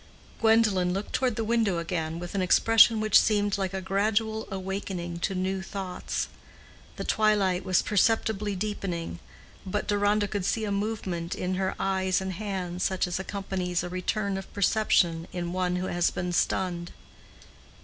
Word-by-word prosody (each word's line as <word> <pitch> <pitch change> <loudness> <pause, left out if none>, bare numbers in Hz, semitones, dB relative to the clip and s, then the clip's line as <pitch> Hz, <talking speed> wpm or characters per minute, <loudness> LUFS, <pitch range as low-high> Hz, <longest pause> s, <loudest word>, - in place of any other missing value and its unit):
Gwendolen 215 -5 +3
looked 195 +2 -4
toward 255 -4 +1
the 225 - -1
window 220 -5 +1
again 165 -1 -2
with 175 0 -6
an 195 - 0
expression 225 +4 +5
which 215 -1 +5
seemed 205 -2 +1
like 190 -2 -1
a 190 0 -3
gradual 220 +3 0
awakening 190 -2 -4
to 190 +3 -1
new 190 +1 -1
thoughts. 190 -1 -4 0.7
The - - -5
twilight 205 -4 +2
was 185 -2 +2
perceptibly 210 -1 +1
deepening, 180 -4 -3 0.4
but 205 +2 -3
Deronda 205 0 +2
could 200 -1 -3
see 220 +3 0
a 205 - -2
movement 200 -5 -2
in 180 +1 -2
her 190 0 -1
eyes 190 -1 +1
and 190 0 -4
hands 185 -2 -4
such 190 0 +1
as 180 0 -3
accompanies 190 -3 -2
a 175 - -4
return 195 +2 -1
of 195 - -11
perception 180 -5 +2
in 175 -1 -3
one 180 -1 0
who 180 +1 -2
has 175 -1 +1
been 180 0 -3
stunned. 175 -1 0
190 Hz, 160 wpm, -27 LUFS, 180-210 Hz, 0.7 s, expression